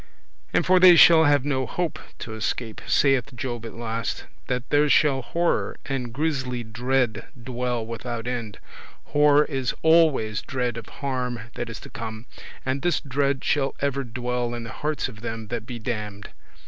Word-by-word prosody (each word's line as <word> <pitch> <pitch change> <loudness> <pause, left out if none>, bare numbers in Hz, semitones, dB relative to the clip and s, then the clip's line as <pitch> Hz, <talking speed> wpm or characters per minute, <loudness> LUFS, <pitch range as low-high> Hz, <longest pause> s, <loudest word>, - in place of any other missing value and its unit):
And - - +2
for 185 0 +5
they 180 -1 +9
shall 165 -1 +8
have 145 -2 +3
no 130 -3 0
hope 175 -3 -2 0.2
to 110 - -7
escape, 110 +1 -3
saith 135 -2 +2
Job 120 -2 -4
at - - -10
last, 115 0 -3 0.2
that 125 0 -2
there 150 0 +4
shall 140 -2 +4
horror 170 +6 0
and 130 -3 -3
grisly 130 -3 -2
dread 120 0 -1
dwell 120 -1 -2
without 115 0 -5
end. 120 -4 -4 0.5
Horror 150 0 +4
is 135 -4 -2
always 160 -10 +4
dread 125 -3 -2
of 115 -1 -7
harm 125 -3 -3
that 120 - -4
is 115 - -7
to - - -11
come, 115 -2 -6 0.4
and 130 +1 -1
this 175 +3 +1
dread 140 -1 -1
shall 140 -2 +1
ever 140 -1 0
dwell 125 0 -2
in 120 - -5
the 115 - -7
hearts 150 -1 -2
of 110 -4 -11
them 115 -2 -5
that 115 -1 -4
be 125 - -5
damned. 105 -3 -5
125 Hz, 170 wpm, -25 LUFS, 115-140 Hz, 0.5 s, they